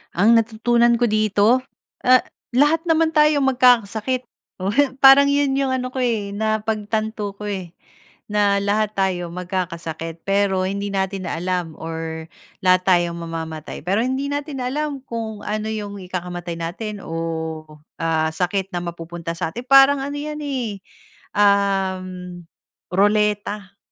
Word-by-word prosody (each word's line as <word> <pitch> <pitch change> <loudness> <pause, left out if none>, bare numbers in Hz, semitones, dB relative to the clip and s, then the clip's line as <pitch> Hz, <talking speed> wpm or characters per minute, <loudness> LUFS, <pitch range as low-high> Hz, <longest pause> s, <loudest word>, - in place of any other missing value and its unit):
Ang 220 +6 +5
natutunan 235 +1 +2
ko 240 - +2
dito. 215 +2 +3 0.4
Ah, 255 0 +5 0.3
lahat 295 +4 +4
naman 325 0 +3
tayo 300 -1 +4
magkakasakit. 250 -1 +2 0.3
Oh, 195 +2 -1 0.3
parang 275 +1 +8
'yon 280 -1 +2
'yong 275 -1 +1
ano 255 -1 -1
ko, 260 - -2
eh, 210 -5 -1
napagtanto 215 -1 -2
ko, - - -9
eh. 190 -4 -4 0.6
Na 205 -1 +3
lahat 210 +1 0
tayo 180 -3 0
magkakasakit, 170 -3 -4
pero 195 -1 +1
hindi 200 +1 -3
natin 190 -1 -2
alam 180 -1 -2
or 160 0 -5 0.4
lahat 185 0 +4
tayo 175 -2 +4
mamamatay 160 -2 -6
pero 195 +5 +1
hindi 265 +2 -2
natin 285 -2 -4
alam 285 +2 -2
kung 220 -3 -5
ano 215 +1 -2
'yong 205 -2 -5
ikakamatay 175 -2 -5
natin 200 +5 -5
o, 160 -1 -4 0.4
ah, 160 -1 +1
sakit 185 +3 -1
na 175 - -2
mapupunta 170 0 -6
sa'tin. 235 +11 -4
Parang 275 +1 +7
ano 285 +1 -4
'yan, 300 +1 -5
eh, 245 -8 -3 0.6
um, 190 -3 +1 0.5
roleta. 205 0 +1
205 Hz, 130 wpm, -21 LUFS, 180-240 Hz, 0.6 s, parang